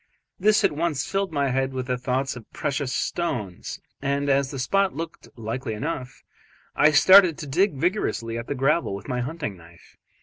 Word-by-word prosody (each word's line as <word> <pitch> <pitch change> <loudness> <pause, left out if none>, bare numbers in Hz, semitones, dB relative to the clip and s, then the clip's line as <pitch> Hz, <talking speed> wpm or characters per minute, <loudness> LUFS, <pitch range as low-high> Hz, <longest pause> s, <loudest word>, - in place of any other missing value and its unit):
This 210 +3 +4
at - - +4
once 150 -2 -1
filled 195 -1 -1
my 140 -3 0
head 135 +1 0
with 130 -1 -3 0.2
thoughts 130 +2 -1
of 120 -3 -12
precious 140 -2 -2
stones, 115 - -3 0.2
and 140 +1 0
as 135 0 +2
the 135 - -6
spot 195 +8 +1
looked 165 +1 -6
likely 115 +1 -4
enough, 130 +1 -5 0.5
I 150 - +6
started 185 +2 +7
to - - -6
dig 170 +5 +1
vigorously 135 - -1
at 115 0 -5
the 145 - -2
gravel 135 -3 +1
with 100 - -9
my 125 -1 -1
hunting 150 -5 -4
knife. 85 -1 -18
140 Hz, 175 wpm, -24 LUFS, 125-165 Hz, 0.5 s, started